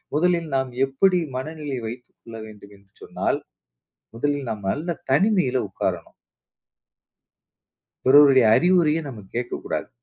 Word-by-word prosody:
முதலில் 170 0 +1
நாம் 130 -1 -1
எப்படி 180 +7 +2 0.2
மனநிலையை 145 -2 -5
வைத்துக் 120 +2 -10
கொள்ள 115 -1 -12
வேண்டும் 105 -2 -14
என்று 100 -1 -28
சொன்னால், - - -2 0.8
முதலில் 145 +1 -2
நாம் 105 -3 -6
நல்ல 165 +3 -3 0.2
தனிமையில 180 - +2
உட்காரணும். 95 - -4 1.9
பிறருடைய 135 -2 +7
அறிவுரைய 170 -3 +3
நம்ம 115 -7 -9
கேட்கக்கூடாது. 120 0 -4
135 Hz, 110 wpm, -23 LUFS, 120-165 Hz, 1.9 s, பிறருடைய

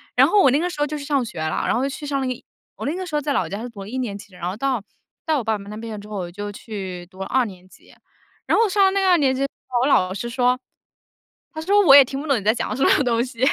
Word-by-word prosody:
然 - - +6
后 415 -1 +4
我 265 - +5
那 285 - +3
个 355 - -1
时 345 - -8
候 295 - +2
就 300 +1 -4
去 285 - -7
上 280 -3 +1
学 175 - -8
了， 155 0 -1
然 - - +2
后 245 - 0
就 275 - 0
去 290 +2 -7
上 280 -1 -1
那 260 - -1
个 255 - 0
一 - - -16 0.3
我 - - -6
那 300 +5 -1
个 370 0 -4
时 320 - -5
候 295 - +1
在 285 0 -1
老 - - 0
家 200 +3 -5
是 245 - -6
读 205 -4 -10
了 195 - -8
一 260 - -4
年 225 -6 -3
级 205 -1 -14
的， 180 - -15
然 175 0 -3
后 190 - -4
到 255 -2 -1 0.4
到 310 -3 +1
我 - - -4
爸 220 -1 0
爸 200 - -11
那 210 +1 -8
边 220 -2 -6
之 205 - -11
后， 210 - -7
我 175 -2 -4
就 205 +2 -6
去 190 -4 -7
读 185 +1 -18
了 - - -2
二 255 -1 +2
年 185 -3 -11
级。 - - -20 0.5
然 - - +2
后 450 0 +4
上 395 0 +4
了 380 - +4
那 395 - +1
个 380 - +3
二 355 - +6
年 265 -3 +2
级 270 - -3
之 275 - +2 0.2
后， 245 - 0
我 260 - +2
老 185 -9 +3
师 235 +4 -4
说 250 +1 +2 1.0
他 315 - -5
说： 405 +5 +4
“我 275 -2 +9
也 280 - +10
听 270 +2 -5
不 310 - -7
懂 275 -4 +2
你 - - -9
在 215 +2 +4
讲 240 - -3
什 270 - +1
么 285 - +4
东 235 -2 +1
西。 245 -3 -12
250 Hz, 370 characters per minute, -22 LUFS, 205-290 Hz, 1.0 s, 也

